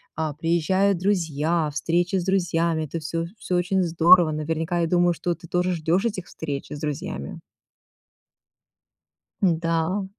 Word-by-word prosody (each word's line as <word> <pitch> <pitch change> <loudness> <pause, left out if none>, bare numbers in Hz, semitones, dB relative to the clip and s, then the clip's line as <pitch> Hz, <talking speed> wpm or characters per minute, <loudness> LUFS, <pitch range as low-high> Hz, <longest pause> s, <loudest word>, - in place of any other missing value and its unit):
а, 155 -1 -2
приезжают 170 +5 +1
друзья, 165 -4 0
встречи 175 +5 0
с 175 - -2
друзьями, 170 -4 +1
это 165 +3 -5
всё 165 +2 -3
всё 180 - -3
очень 185 +2 +1
здорово. 170 0 +5
Наверняка 160 +3 -2
я 170 - +1
думаю, 175 0 +3
что 175 +1 -2
ты 170 +1 -14
тоже 180 +2 0
ждешь 170 +4 0
этих 200 -6 -2
встреч 145 -3 -5
с 145 - -5
друзьями. 150 +5 -4 2.0
Да 165 +2 +1
170 Hz, 135 wpm, -24 LUFS, 160-180 Hz, 2.0 s, здорово